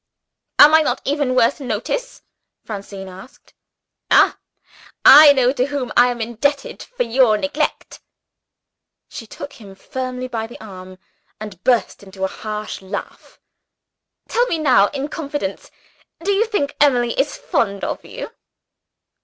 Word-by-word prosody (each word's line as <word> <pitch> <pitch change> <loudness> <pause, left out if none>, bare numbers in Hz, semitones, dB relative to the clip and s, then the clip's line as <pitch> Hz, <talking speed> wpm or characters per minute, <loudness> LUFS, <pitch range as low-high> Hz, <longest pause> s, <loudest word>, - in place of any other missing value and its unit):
"Am 300 +1 +8
I 315 - +7
not 265 -4 -1
even 280 -3 0
worth 250 +3 +2
notice?" - - -4 0.4
Francine 200 -2 -8
asked. 190 +7 -14 0.6
"Ah, - - +4 0.7
I 295 +1 +10
know 260 -3 +3
to 260 -1 -1
whom 280 -4 -4
I 245 - +6
am 245 -1 -3
indebted 240 +5 -2
for - - -4
your 235 -2 +3
neglect!" 290 +5 -3 1.1
She 225 - -9
took 285 +6 -9
him 195 -2 -12
familiarly 255 +4 -5
by 225 -3 -4
the 240 - -13
arm, 185 -3 -11 0.4
and 205 -4 -9
burst 240 -5 +1
into 190 -1 -9
a - - +2
harsh 215 +1 -6
laugh. 190 0 -8 0.9
"Tell 485 +1 +1
me 335 - -1
now, 255 -10 +4
in 280 +3 -4
confidence 290 -10 -5 0.5
do 400 - 0
you 400 +3 +2
think 345 -11 -2
Emily 245 -5 +3
is 275 +2 -1
fond 200 -3 -2
of - - -4
you?" - - -8
250 Hz, 140 wpm, -19 LUFS, 210-285 Hz, 1.1 s, I